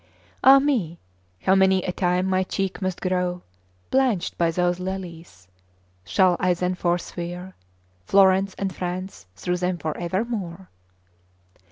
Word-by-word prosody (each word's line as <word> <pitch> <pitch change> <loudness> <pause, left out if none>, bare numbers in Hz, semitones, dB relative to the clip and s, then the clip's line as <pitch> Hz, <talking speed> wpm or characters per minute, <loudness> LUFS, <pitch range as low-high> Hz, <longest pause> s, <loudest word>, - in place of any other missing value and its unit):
Ah 270 +2 +9
me! 245 - 0 0.5
how 190 - +4
many 190 -1 +4
a 180 - -2
time 180 0 0
my 190 0 +1
cheek 195 +1 -3
must 185 -1 -3
grow 180 -1 -1 0.5
Blanched 255 -9 +1
by 170 -1 +2
those 175 +1 0
lilies! 175 - -7 0.6
Shall 175 - +3
I 180 -1 +2
then 180 +1 -1
forswear 175 +1 -3 0.5
Florence 195 0 +4
and 195 -2 -3
France 180 - -5
through 180 - -2
them 180 0 -1
for 160 -2 -4
evermore? 190 0 -3
185 Hz, 130 wpm, -24 LUFS, 175-190 Hz, 0.6 s, Ah